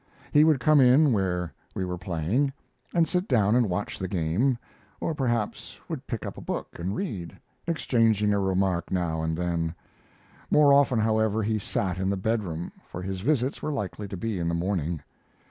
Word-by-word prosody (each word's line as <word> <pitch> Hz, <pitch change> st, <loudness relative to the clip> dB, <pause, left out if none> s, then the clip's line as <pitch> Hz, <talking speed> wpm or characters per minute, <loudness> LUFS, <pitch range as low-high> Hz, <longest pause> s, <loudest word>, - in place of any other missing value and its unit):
He 150 Hz, -, +6 dB
would 155 Hz, -3 st, +4 dB
come 150 Hz, +4 st, +5 dB
in 130 Hz, +2 st, +6 dB
where 90 Hz, -5 st, -1 dB, 0.2 s
we 95 Hz, -, -1 dB
were 90 Hz, 0 st, -3 dB
playing, 95 Hz, -, 0 dB, 0.4 s
and 170 Hz, -2 st, +3 dB
sit 180 Hz, +3 st, 0 dB
down 110 Hz, -4 st, +3 dB
and 120 Hz, -4 st, +3 dB
watch 90 Hz, +3 st, -3 dB
the 95 Hz, -, -2 dB
game, 95 Hz, +9 st, +1 dB, 0.4 s
or 165 Hz, -, -1 dB
perhaps 120 Hz, -7 st, -2 dB
would -, -, -6 dB
pick -, -, -4 dB
up -, -, -6 dB
a -, -, -9 dB
book -, -, -4 dB
and 95 Hz, +4 st, -2 dB
read, 95 Hz, -, -4 dB, 0.3 s
exchanging 115 Hz, -10 st, +2 dB
a 100 Hz, -, +2 dB
remark 95 Hz, -2 st, 0 dB
now 85 Hz, -3 st, -1 dB
and 80 Hz, 0 st, -1 dB
then. 85 Hz, -1 st, -1 dB, 0.7 s
More 145 Hz, -2 st, +6 dB
often, 140 Hz, -3 st, +4 dB
however, 110 Hz, 0 st, +2 dB
he 110 Hz, +1 st, 0 dB
sat 95 Hz, -2 st, -2 dB
in 95 Hz, 0 st, 0 dB
the 100 Hz, -, 0 dB
bedroom, 95 Hz, -5 st, -2 dB, 0.2 s
for 90 Hz, -, -7 dB
his 95 Hz, 0 st, -4 dB
visits 130 Hz, +2 st, 0 dB
were 155 Hz, -, -2 dB
likely 105 Hz, -5 st, -4 dB
to 95 Hz, -, -6 dB
be 105 Hz, +1 st, -2 dB
in 85 Hz, -, -1 dB
the 85 Hz, -, 0 dB
morning. 85 Hz, -4 st, -1 dB
100 Hz, 185 wpm, -27 LUFS, 90-125 Hz, 0.7 s, He